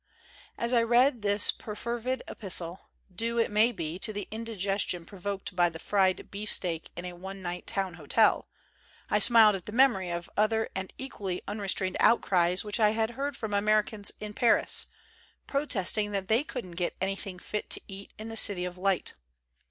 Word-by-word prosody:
As 235 +1 -1
I 235 - +5
read 240 +2 +3
this 205 0 +3
perfervid 235 +4 -4
epis 195 -4 -1
tle, 170 +1 -3 0.3
due, 230 +4 -1
it 230 - +2
may 215 +3 +4
be, 170 -5 -5
to 215 - +1
the 205 -1 -5
indigestion 200 -5 -1
provoked 195 0 -6
by 175 -1 +4
the 165 - -9
fried 190 +1 +1
beefsteak 185 -5 -1
in 175 - -6
a 180 - -5
one 190 +2 -8
night 175 0 -5
town 195 -5 -2
hotel, 165 +8 +2 0.6
I - - +4
smiled 225 -3 +7
at 185 - -8
the - - -4
memory 230 -7 +3
of 170 0 -4
other 220 +1 +1
and 190 0 -4
equally 200 -9 -5
unrestrained 195 -2 -1
outcries 180 -5 +3
which 210 +2 -2
I 215 -1 +4
had 220 +1 0
heard 275 +1 -4
from 220 -3 -4
Americans 210 0 +2
in 210 0 -6
Paris, 235 +2 +3 0.6
protesting 215 -7 -1
that 195 0 -3
they 225 +5 +3
couldn't 185 - -7
get 175 - -1
anything 195 0 -3
fit 210 +3 -5
to - - 0
eat 195 0 -10
in 215 - -7
the 225 - -6
City 185 -5 +5
of 180 0 -7
Light. 190 -1 0
205 Hz, 175 wpm, -29 LUFS, 185-225 Hz, 0.6 s, smiled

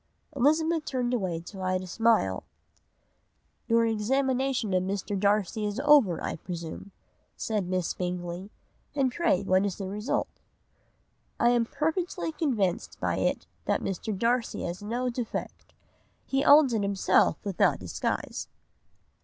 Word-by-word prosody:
"Elizabeth 315 +4 +2
turned 250 -2 -1
away 185 -8 -1
to 190 +3 -10
hide 185 0 -1
a - - -6
smile. 185 - +2 1.2
"'Your 230 0 +4
examination 255 0 0
of 185 - +3
Mr. 195 +2 -2
Darcy 205 +2 +1
is 210 +3 -2
over, 280 - +5
I - - -3
presume?' 170 +2 -7 0.5
said 210 -5 -1
Miss 185 -2 -1
Bingley, 180 +1 -4 0.5
'and 270 -3 +2
pray 255 - +1
what 190 0 +3
is 200 -3 -1
the 195 - -5
result?' 210 +5 -3 1.0
"'I 235 - +5
am 240 -1 +3
perfectly 325 +4 -2
convinced 235 - -1
by - - 0
it - - 0 0.2
that - - 0
Mr. 195 +2 -3
Darcy 235 +3 0
has 175 +2 -4
no 240 +4 -2
defect. 240 -1 -5 0.5
He 270 0 0
owns 285 -4 +7
it 220 - +1
himself 200 -1 +3
without 195 -4 +2
disguise. - - -3
215 Hz, 135 wpm, -28 LUFS, 185-260 Hz, 1.2 s, owns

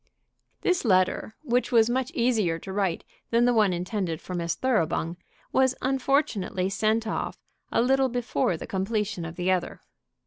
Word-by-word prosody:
This 360 -1 +1
letter, 185 0 +2
which 250 -3 0
was 225 -2 +5
much 255 +1 0
easier 220 -9 +2
to 190 +3 -8
write 195 -4 0 0.3
than 235 +1 +3
the 245 - +4
one 215 -4 +4
intended 180 -1 -2
for 185 - -8
Miss 170 -1 -1
Thoroughbung, 170 -9 0 0.4
was 260 -1 +3
unfortunately 260 -8 0
sent 220 +3 +1
off 220 - -3 0.3
a - - +3
little 265 +1 +3
before 235 - 0
the - - -7
completion 200 -2 -2
of 165 +1 -7
the 180 +1 0
other. 185 -2 -1
215 Hz, 160 wpm, -26 LUFS, 180-245 Hz, 0.4 s, was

